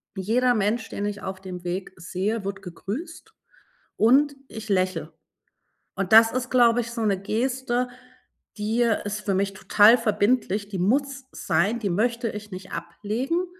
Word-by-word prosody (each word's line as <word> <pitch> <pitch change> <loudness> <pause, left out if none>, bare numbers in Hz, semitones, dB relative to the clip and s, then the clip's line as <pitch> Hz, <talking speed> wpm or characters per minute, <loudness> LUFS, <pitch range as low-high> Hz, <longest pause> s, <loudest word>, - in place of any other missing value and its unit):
Jeder 240 +6 +2
Mensch, 220 +2 0
den 205 - -4
ich 205 0 -4
auf 190 -1 -6
dem 180 -2 -8
Weg 180 +2 -4
sehe, 195 +5 -3
wird 195 0 -4
gegrüßt 295 - -7 0.6
und 275 +6 +4
ich 220 -1 -9
lächel, 185 -5 0 0.8
und 195 +2 -1
das 225 0 +8
ist, 255 0 -2
glaube 240 -1 +4
ich, 235 - -7
so 235 -1 -4
'ne 200 -3 +1
Geste, 245 +3 -1 0.7
die 220 +3 0
ist 210 -2 -1
für 200 -2 -1
mich 195 +1 0
total 210 +5 +5
verbindlich, 210 -2 +1
die 200 -2 -5
muss 275 +8 0
sein, 195 +9 0
die 205 -3 -1
möchte 235 +5 0
ich 210 0 -8
nicht 185 0 -8
ablegen. 220 - -3
215 Hz, 155 wpm, -25 LUFS, 195-240 Hz, 0.8 s, das